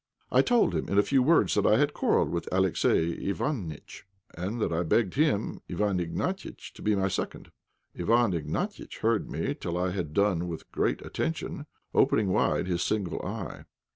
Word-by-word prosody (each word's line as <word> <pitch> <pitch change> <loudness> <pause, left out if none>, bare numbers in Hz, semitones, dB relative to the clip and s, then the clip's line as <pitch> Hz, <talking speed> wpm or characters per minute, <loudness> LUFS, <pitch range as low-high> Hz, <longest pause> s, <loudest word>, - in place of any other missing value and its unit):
I - - +6
told 240 - +3
him 80 - -2
in 100 - 0
a 100 - +6
few 135 +3 +3
words 160 +6 +4
that 105 - +2
I 105 - +5
had 145 +2 +2
quarrelled - - +2
with 85 -1 -3
Alexey 90 -3 +2
Iványtch, 95 - -4 0.3
and 95 +8 -3
that 95 - 0
I 80 - +1
begged 90 +3 +1
him, 140 -8 +1
Iwán 95 0 0
Ignatiitch, 85 -1 -4
to - - -13
be 105 0 +2
my 95 -1 +1
second. 95 - -4 0.4
Iwán 115 -3 +2
Ignatiitch 85 -3 -4
heard 115 -1 +1
me - - -2
till 85 +1 -4
I 90 +1 0
had 90 -5 -3
done 95 -1 +1
with 85 -2 -7
great - - -1
attention, 80 - -3 0.3
opening 105 -3 +3
wide 90 - +2
his 90 -2 -1
single 100 -4 -1
eye. 100 -2 -6
95 Hz, 175 wpm, -28 LUFS, 85-110 Hz, 0.4 s, I